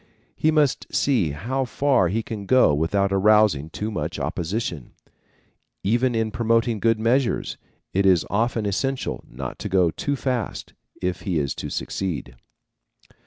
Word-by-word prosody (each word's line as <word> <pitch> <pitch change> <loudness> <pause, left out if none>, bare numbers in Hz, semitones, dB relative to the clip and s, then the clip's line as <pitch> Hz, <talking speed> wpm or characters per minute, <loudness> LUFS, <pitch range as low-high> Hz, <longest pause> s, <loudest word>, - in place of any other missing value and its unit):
He 155 - +2
must 150 -4 +2
see 120 - +2
how 120 - -2
far 130 -5 +2
he 110 +6 -1
can 105 -3 -6
go 130 -11 +5
without 95 +6 +1
arousing 100 -6 +4
too 105 +6 -4
much 105 - -3
opposition. 85 - -3 0.9
Even 120 +4 +2
in 110 -1 0
promoting 115 0 +1
good 115 +1 +2
measures, 120 +3 +1 0.4
it 95 +1 +3
is 90 -4 +4
often 115 +2 0
essential 130 +7 -2
not - - -7
to - - -4
go 90 -3 +3
too 140 - -2
fast, 125 -3 -3 0.3
if 90 0 -1
he 95 -5 -1
is 70 -3 0
to - - -6
succeed. 80 -10 -4
105 Hz, 145 wpm, -23 LUFS, 90-120 Hz, 0.9 s, go